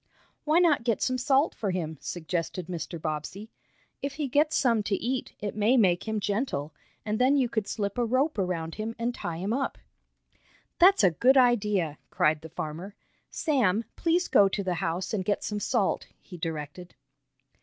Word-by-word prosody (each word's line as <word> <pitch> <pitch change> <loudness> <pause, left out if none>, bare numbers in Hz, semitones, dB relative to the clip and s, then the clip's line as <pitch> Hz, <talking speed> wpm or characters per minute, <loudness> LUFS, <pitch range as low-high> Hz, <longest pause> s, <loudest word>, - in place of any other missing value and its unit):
"Why 310 +2 +3
not 335 -8 +4
get 230 -3 +1
some 255 0 0
salt 275 +3 +2
for 210 - -3
him?" 160 -5 -3
suggested 175 +1 -3
Mr. 170 -1 -5
Bobbsey. 160 +7 -5 0.5
"If 280 0 -4
he 300 -2 -2
gets 295 +4 +2
some 235 -4 +3
to 205 -1 -1
eat 250 +5 -3
it 205 -1 -4
may 215 +5 +3
make 185 -3 +3
him 220 -1 -1
gentle, 200 - -2 0.3
and 215 0 -1
then 265 +3 +4
you 260 -3 +2
could 220 -3 -2
slip 200 +1 -3
a - - +3
rope 255 +3 +1
around 170 -3 -2
him 220 +2 -4
and 235 +1 -1
tie 170 -7 -5
him 195 +6 -2
up." 270 +2 -2 1.0
"That's 370 - +6
a 185 - +6
good 250 - +4
idea!" 210 - +2
cried 155 0 +1
the 160 - -10
farmer. 165 +7 -6 0.3
"Sam, 230 - +1
please 345 +2 +1
go 200 -1 +5
to 200 +1 -2
the 185 -1 -1
house 175 +6 -2
and 200 -3 0
get 205 +2 -1
some 210 -1 -3
salt," - - 0
he 185 - -12
directed. 165 +1 -6
210 Hz, 180 wpm, -27 LUFS, 175-255 Hz, 1.0 s, That's